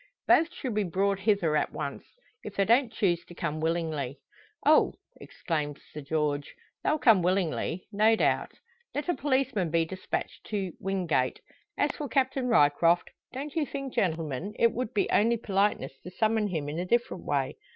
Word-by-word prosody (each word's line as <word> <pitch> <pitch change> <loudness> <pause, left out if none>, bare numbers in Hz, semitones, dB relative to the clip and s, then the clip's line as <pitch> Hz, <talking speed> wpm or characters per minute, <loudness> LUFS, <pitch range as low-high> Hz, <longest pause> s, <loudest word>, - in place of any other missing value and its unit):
"Both 330 +1 +5
should 260 -9 -4
be 210 0 +1
brought 195 +2 0
hither 195 -7 +2
at - - +1
once - - -5 0.4
if 210 - -8
they 195 - +2
don't 235 +2 +4
choose 175 -6 +1
to 175 - -13
come 155 -2 -3
willingly." 160 -5 -1 0.5
"Oh!" - - +5 0.2
exclaims 150 -3 -4
Sir 150 - -6
George, 145 -1 -2 0.3
"they'll 305 - +2
come 225 -10 +5
willingly," 180 -1 0
no 215 +2 +4
doubt. - - +1 0.4
Let 295 +4 -2
a - - +4
policeman 260 - 0
be 165 0 +2
despatched 185 +3 -5
for 195 -4 -2
"Wingate. 175 -9 0 0.4
As - - +2
for 295 -3 -6
Captain 260 0 +1
Ryecroft, 165 -4 +3 0.2
don't 275 +3 -6
you 320 - +2
think 275 -1 -5
gentlemen, 165 +2 -1
it 230 - +4
would 245 -2 -3
be 205 - +1
only 230 +3 +3
politeness 200 - 0
to - - -8
summon 215 +2 +1
him 160 -7 -3
in 150 +3 -3
a 180 - -2
different 240 +4 0
way. - - -1
195 Hz, 170 wpm, -28 LUFS, 160-230 Hz, 0.5 s, Both